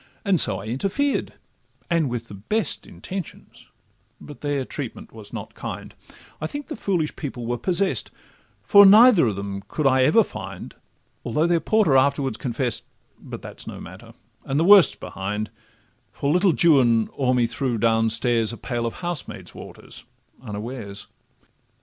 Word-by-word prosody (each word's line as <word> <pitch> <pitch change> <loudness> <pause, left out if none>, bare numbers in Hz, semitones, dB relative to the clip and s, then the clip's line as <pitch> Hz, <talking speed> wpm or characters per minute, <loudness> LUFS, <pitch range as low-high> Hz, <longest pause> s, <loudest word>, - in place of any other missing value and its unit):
And 195 -4 +4
so 105 - +3
I 95 - -9
interfered, 195 - -1 0.5
and 165 -5 +1
with 120 -1 -4
the - - -11
best 170 - -3
Intentions, 190 -4 -9 0.5
but 145 - -12
their 145 -2 -1
treatment 135 -4 -7
was 110 -2 -11
not - - -7
kind; - - -7 0.5
I 155 - -1
think 290 - -6
the - - -4
foolish 175 -8 -1
people 130 -5 -6
were 120 +1 -2
possess'd, 190 +1 0 0.5
For 200 0 +7
neither 210 - +7
of 105 - -1
them 100 0 -5
could 155 - -3
I 130 -1 +4
ever 225 - +5
find, - - -8 0.5
Although 150 +2 0
their 170 -1 +2
porter 190 -5 +3
afterwards 135 -3 +1
confess'd— 120 0 -2 0.3
But - - -9
that - - -10
's - - -9
no - - -7
matter, - - -12 0.3
and 135 +2 -1
the - - +3
worst 195 0 +7
's - - -14
behind, 105 +2 -5 0.6
For 140 - -2
little 180 0 +3 0.2
Juan 120 -5 +3
o'er 130 -2 +2
me 120 -1 +3
threw, 115 +1 -2
down 115 0 +2
stairs, 115 -1 +1
A 120 - -8
pail 120 -1 -3
of 115 - -7
housemaid's 175 -4 -5
water - - -12 0.5
unawares. 105 -2 -7
130 Hz, 160 wpm, -23 LUFS, 115-175 Hz, 0.6 s, For